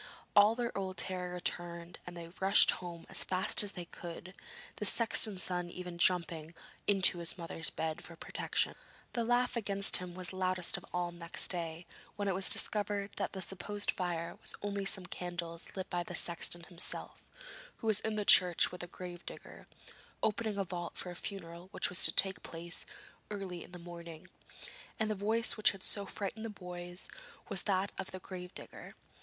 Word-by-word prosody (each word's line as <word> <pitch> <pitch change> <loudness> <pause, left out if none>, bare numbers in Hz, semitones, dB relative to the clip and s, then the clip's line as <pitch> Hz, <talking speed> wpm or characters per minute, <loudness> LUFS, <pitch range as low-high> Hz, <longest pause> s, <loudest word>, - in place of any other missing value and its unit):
All 205 +2 +7
their 240 0 -2
old 190 -1 -3
terror 180 -1 -2
returned, 175 -1 -4
and 175 -1 -7
they 165 -1 -7
rushed 195 +1 +6
home 170 -2 -7
as - - 0
fast 185 0 +3
as 205 -1 -1
they 175 - -5
could, 170 +2 -8 0.4
the 210 - -1
sexton's 215 -3 +5
son 180 -1 0
even 180 -1 -7
jumping 170 -2 +1 0.3
into 190 -3 +6
his 170 +1 +2
mother's 165 -1 -2
bed 160 -1 -3
for 170 - -9
protection. - - -1 0.4
The 235 - 0
laugh 245 +2 +2
against 200 -3 +3
him 180 -1 -7
was 185 -1 -4
loudest 185 -1 +2
of - - -7
all 175 -1 -1
next 170 -1 -2
day, 170 -1 -4 0.3
when 205 -1 -2
it 195 - +2
was 190 +1 0
discovered 205 -1 +4
that - - -2
the 190 -1 -3
supposed 205 +2 +1
fire 170 -2 -2
was - - -1
only 200 -1 -1
some 190 -1 +4
candles 175 -2 -4
lit 190 -1 -3
by 175 - +1
the - - -5
sexton 170 0 -1
himself, 175 -1 -5 0.5
who - - -10
was 215 -2 +4
in 220 -1 -1
the 210 -1 -1
church 180 -3 +7
with 180 - -6
the 175 - -5
grave 175 0 -8
digger, - - -9 0.6
opening 215 -1 +1
a 195 - +2
vault 175 -1 -5
for 180 - -4
a - - -8
funeral 175 -2 -7
which - - 0
was 180 - +5
to - - +6
take 190 -1 +2
place 170 +1 -6 0.4
early 195 -4 -5
in - - -14
the 180 - -8
morning; 170 -2 -9 0.7
and 220 -1 +1
the - - +2
voice 220 +4 +1
which 215 - +6
had 195 -2 -7
so 200 -1 +1
frightened 205 +3 -4
the 225 - -3
boys 180 -2 -7 0.4
was - - +4
that 195 -1 +1
of 190 - -3
the 185 - -7
grave 180 -1 -7
digger. - - -10
180 Hz, 185 wpm, -34 LUFS, 175-200 Hz, 0.7 s, All